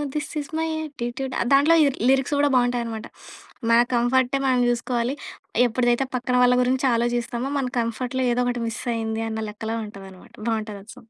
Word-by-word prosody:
This 300 Hz, 0 st, -3 dB
is 285 Hz, -, -11 dB
my 325 Hz, -, 0 dB
attitude. 265 Hz, -3 st, -5 dB, 0.2 s
దాంట్లో 290 Hz, +4 st, +6 dB
ఈ -, -, +5 dB, 0.2 s
lyrics 270 Hz, +2 st, +2 dB
గూడా 290 Hz, 0 st, +3 dB
బావుంటాయన్నమాట 240 Hz, -3 st, 0 dB, 0.6 s
మన 230 Hz, -, +6 dB, 0.2 s
కంఫర్టే 250 Hz, +2 st, +2 dB
మనం 255 Hz, -1 st, +3 dB
జూసుకోవాలి 240 Hz, +1 st, -1 dB, 0.5 s
ఎప్పుడిదైతే 240 Hz, +2 st, +1 dB
పక్కన 250 Hz, 0 st, -1 dB
వాళ్ళ 250 Hz, 0 st, +5 dB
గురించి 260 Hz, +2 st, +1 dB
ఆలోచిస్తామో 240 Hz, +2 st, -1 dB
మన 265 Hz, -, -1 dB
కంఫర్ట్‌లో 250 Hz, +3 st, -2 dB
ఏదో 245 Hz, -, +1 dB
ఒకటి 245 Hz, -1 st, -1 dB
మిస్ 225 Hz, 0 st, -5 dB
అయింది 225 Hz, 0 st, -2 dB
అన్న 220 Hz, 0 st, -3 dB
లెక్కలో 220 Hz, +1 st, -4 dB
ఉంటదనమాట. 195 Hz, -3 st, -12 dB
బావుంటది 215 Hz, -3 st, -2 dB
ఆ -, -, -36 dB
సాంగ్‌. 240 Hz, -3 st, -17 dB
245 Hz, 160 wpm, -23 LUFS, 230-260 Hz, 0.6 s, దాంట్లో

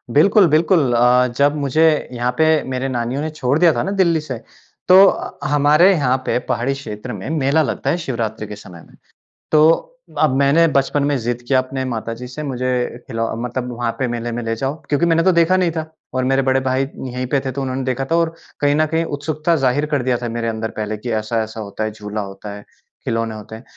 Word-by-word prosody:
बिल्कुल, 200 Hz, +6 st, +6 dB
बिल्कुल। 155 Hz, -4 st, +3 dB
अ, 125 Hz, +1 st, +4 dB
जब 145 Hz, +1 st, +3 dB
मुझे 145 Hz, +2 st, +1 dB, 0.3 s
यहाँ 120 Hz, +1 st, -1 dB
पे 160 Hz, -, +4 dB, 0.3 s
मेरे 130 Hz, +1 st, -2 dB
नानियों 125 Hz, +3 st, -2 dB
ने 155 Hz, -, -2 dB
छोड़ 140 Hz, -3 st, 0 dB
दिया 175 Hz, -2 st, +6 dB
था -, -, -1 dB
ना 195 Hz, -, -2 dB
दिल्ली 180 Hz, -5 st, +2 dB
से, 130 Hz, -5 st, -5 dB, 0.5 s
तो 190 Hz, +2 st, +8 dB
अ, -, -, -2 dB
हमारे 150 Hz, +6 st, +5 dB
यहाँ 130 Hz, -5 st, +1 dB
पे -, -, +1 dB
पहाड़ी 120 Hz, +4 st, 0 dB
क्षेत्र 125 Hz, -3 st, -7 dB
में -, -, -6 dB
मेला 155 Hz, 0 st, +2 dB
लगता 150 Hz, -, -2 dB
है 175 Hz, -, +1 dB
शिवरात्रि 115 Hz, -8 st, -4 dB
के 105 Hz, -, -7 dB
समय 90 Hz, -4 st, -12 dB
में। -, -, -20 dB, 0.6 s
तो 155 Hz, -, +4 dB, 0.3 s
अब 130 Hz, -, +3 dB
मैंने 145 Hz, +4 st, +4 dB
बचपन 140 Hz, 0 st, +1 dB
में 145 Hz, 0 st, +1 dB
ज़िद 120 Hz, 0 st, -3 dB
किया 130 Hz, 0 st, +3 dB
अपने 130 Hz, +1 st, -3 dB
माता 115 Hz, -2 st, -4 dB
जी 125 Hz, +2 st, -8 dB
से 150 Hz, +5 st, -7 dB
मुझे 130 Hz, -2 st, -2 dB, 0.4 s
खिलौ 115 Hz, -2 st, -2 dB, 0.2 s
मतलब 125 Hz, +1 st, -4 dB
वहाँ 120 Hz, -1 st, -2 dB
पे 130 Hz, -, 0 dB
मेले 120 Hz, 0 st, -3 dB
में 120 Hz, -, -3 dB
ले 115 Hz, 0 st, -2 dB
जाओ। 135 Hz, +4 st, -2 dB, 0.2 s
क्योंकि 150 Hz, +3 st, +2 dB
मैंने 165 Hz, 0 st, +3 dB
तो 185 Hz, -, +4 dB
देखा 170 Hz, +2 st, +3 dB
नहीं 180 Hz, -3 st, +1 dB
था, 160 Hz, -1 st, -3 dB, 0.3 s
और 130 Hz, 0 st, 0 dB
मेरे 135 Hz, -, +3 dB
बड़े 130 Hz, 0 st, +2 dB
भाई 130 Hz, +1 st, 0 dB, 0.2 s
यहीं 125 Hz, 0 st, -4 dB
पे 140 Hz, +1 st, +1 dB
थे 130 Hz, -, -1 dB
तो 140 Hz, +2 st, -4 dB
उन्होंने 130 Hz, 0 st, -3 dB
देखा 130 Hz, +1 st, -2 dB
था -, -, +4 dB
और 165 Hz, -1 st, +1 dB, 0.3 s
कहीं 145 Hz, 0 st, +3 dB
न 155 Hz, +1 st, +3 dB
कहीं 160 Hz, +2 st, 0 dB
उत्सुकता 155 Hz, +3 st, -1 dB
ज़ाहिर 135 Hz, +1 st, +1 dB
कर 140 Hz, -, +1 dB
दिया 125 Hz, -1 st, +1 dB
था 120 Hz, -, -3 dB
मेरे 115 Hz, 0 st, -3 dB
अंदर 110 Hz, 0 st, -3 dB
पहले 105 Hz, 0 st, -3 dB
कि 120 Hz, +2 st, -5 dB
ऐसा-ऐसा 110 Hz, 0 st, -3 dB
होता 105 Hz, +1 st, -5 dB
है, 110 Hz, -, -2 dB
झूला 105 Hz, 0 st, -5 dB
होता 100 Hz, +1 st, -8 dB
है, 105 Hz, -, -11 dB, 0.4 s
खिलौने 115 Hz, -1 st, -2 dB
होते 110 Hz, +1 st, -9 dB
हैं। 115 Hz, -, -12 dB
130 Hz, 225 wpm, -19 LUFS, 120-150 Hz, 0.6 s, तो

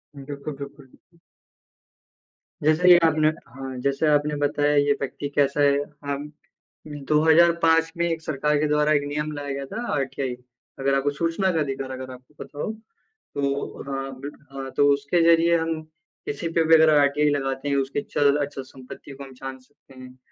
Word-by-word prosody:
बिल्कुल, 140 Hz, +1 st, -7 dB
बिल्कुल, 140 Hz, 0 st, -9 dB
बिल्कुल। 170 Hz, +6 st, -27 dB, 1.5 s
जैसे 160 Hz, +4 st, +4 dB
ये 175 Hz, -, +10 dB
आपने 155 Hz, -1 st, +3 dB
हाँ, 135 Hz, -3 st, -5 dB
जैसे 140 Hz, +3 st, 0 dB
आपने 150 Hz, 0 st, +2 dB
बताया 145 Hz, 0 st, +1 dB
ये 145 Hz, 0 st, +3 dB
व्यक्ति 140 Hz, +1 st, -4 dB
कैसा 145 Hz, 0 st, +2 dB
है 140 Hz, -1 st, +4 dB, 0.3 s
हम 140 Hz, +1 st, -4 dB, 0.8 s
2005 165 Hz, +1 st, +4 dB
में 170 Hz, -, +1 dB
एक 165 Hz, -1 st, -2 dB
सरकार 150 Hz, 0 st, 0 dB
के 155 Hz, -, +1 dB
द्वारा 150 Hz, 0 st, +2 dB
एक 145 Hz, -1 st, +2 dB
नियम 150 Hz, +1 st, -3 dB
लाया 145 Hz, -1 st, -6 dB
गया 140 Hz, 0 st, -5 dB
था 230 Hz, -, -6 dB
आरटीआई। 135 Hz, -2 st, -2 dB, 0.5 s
अगर 135 Hz, 0 st, +1 dB
आपको 135 Hz, +1 st, +1 dB
सूचना 165 Hz, +5 st, 0 dB
का 165 Hz, -, 0 dB
अधिकार 135 Hz, -2 st, -3 dB
अगर 130 Hz, 0 st, -7 dB
आपको 130 Hz, +3 st, -16 dB
पता 145 Hz, -, -17 dB
हो, 215 Hz, -, -2 dB, 0.6 s
तो 140 Hz, 0 st, -2 dB
हाँ, 135 Hz, -1 st, -5 dB
बिट 140 Hz, +2 st, -7 dB, 0.2 s
हाँ 135 Hz, -1 st, -6 dB
तो 145 Hz, -, +5 dB
उसके 145 Hz, +5 st, 0 dB
ज़रिए 170 Hz, 0 st, +5 dB
हम 160 Hz, -1 st, -2 dB, 0.4 s
किसी 145 Hz, +4 st, -4 dB
पे 165 Hz, 0 st, +1 dB
भी 165 Hz, -, +7 dB
अगर 160 Hz, 0 st, +6 dB
आरटीआई 145 Hz, +1 st, +3 dB
लगाते 135 Hz, -1 st, -2 dB
हैं, 140 Hz, -, +1 dB
उसके 140 Hz, +1 st, -1 dB
चल-अचल 145 Hz, -1 st, 0 dB
संपत्ति 130 Hz, +1 st, -12 dB
को 140 Hz, 0 st, -9 dB
हम 135 Hz, -, -12 dB
जान 130 Hz, +1 st, -8 dB
सकते 135 Hz, +1 st, -23 dB
हैं। 130 Hz, 0 st, -12 dB
145 Hz, 175 wpm, -24 LUFS, 135-155 Hz, 1.5 s, ये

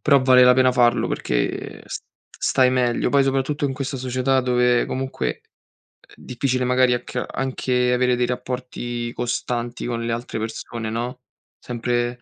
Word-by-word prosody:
però 140 Hz, -3 st, +4 dB
vale 130 Hz, -1 st, +7 dB
la 125 Hz, 0 st, +7 dB
pena 130 Hz, 0 st, +4 dB
farlo, 120 Hz, -1 st, +3 dB
perché -, -, -2 dB
s -, -, -6 dB, 0.3 s
stai 130 Hz, -1 st, +2 dB
meglio. 125 Hz, -2 st, +1 dB
Poi 140 Hz, -1 st, +4 dB
soprattutto 135 Hz, +2 st, 0 dB
in 135 Hz, -, -3 dB
questa 135 Hz, 0 st, -4 dB
società 130 Hz, +1 st, +1 dB
dove 125 Hz, -1 st, +2 dB
comunque 130 Hz, -, -3 dB, 0.7 s
uhm, -, -, -18 dB
difficile 130 Hz, 0 st, -1 dB
magari 125 Hz, 0 st, +3 dB
a 120 Hz, -, 0 dB
che -, -, -4 dB
anche 125 Hz, -1 st, 0 dB
avere 125 Hz, 0 st, +2 dB
dei 125 Hz, 0 st, 0 dB
rapporti 125 Hz, -1 st, -4 dB
costanti 120 Hz, 0 st, -3 dB
con 115 Hz, -1 st, -3 dB
le 115 Hz, -, -1 dB
altre 115 Hz, 0 st, -4 dB
persone, 110 Hz, 0 st, -5 dB
no, 120 Hz, +3 st, -4 dB, 0.4 s
sempre 120 Hz, 0 st, -2 dB
125 Hz, 155 wpm, -22 LUFS, 120-130 Hz, 0.7 s, vale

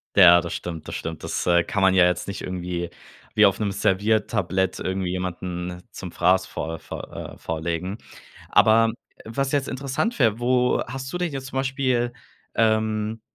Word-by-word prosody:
Ja, 85 Hz, -3 st, +8 dB
das 85 Hz, 0 st, -5 dB
stimmt, 85 Hz, -3 st, -6 dB
das -, -, -6 dB
stimmt. 80 Hz, -1 st, -5 dB
Das, -, -, -2 dB
äh, 85 Hz, -1 st, +5 dB
kann 100 Hz, -, -2 dB
man 95 Hz, 0 st, +5 dB
ja 90 Hz, -1 st, +7 dB
jetzt 90 Hz, 0 st, 0 dB
nicht 100 Hz, -, -5 dB
irgendwie 90 Hz, -1 st, -4 dB, 0.4 s
wie -, -, +6 dB
auf -, -, 0 dB
'nem 105 Hz, -2 st, 0 dB
Serviertablett 95 Hz, -1 st, +1 dB
irgendwie 95 Hz, -1 st, -2 dB
jemanden 90 Hz, -1 st, -4 dB
zum 95 Hz, -4 st, -8 dB
Fraß 95 Hz, +3 st, +3 dB
vor 80 Hz, 0 st, -5 dB
vor -, -, -8 dB, 0.2 s
äh, -, -, -18 dB
vorlegen. 85 Hz, +4 st, -3 dB, 0.5 s
Aber 115 Hz, +1 st, +5 dB, 0.3 s
was 135 Hz, +4 st, -2 dB
jetzt 140 Hz, -2 st, +1 dB
interessant 140 Hz, -, -2 dB
wär, 115 Hz, -4 st, +3 dB
wo 125 Hz, 0 st, +2 dB
hast 130 Hz, +1 st, -6 dB
du -, -, -2 dB
dich 175 Hz, -4 st, -2 dB
jetzt 135 Hz, -1 st, -5 dB
zum 130 Hz, -, -5 dB
Beispiel, 130 Hz, -3 st, 0 dB, 0.4 s
ähm 110 Hz, 0 st, +1 dB
100 Hz, 170 wpm, -24 LUFS, 90-120 Hz, 0.5 s, Ja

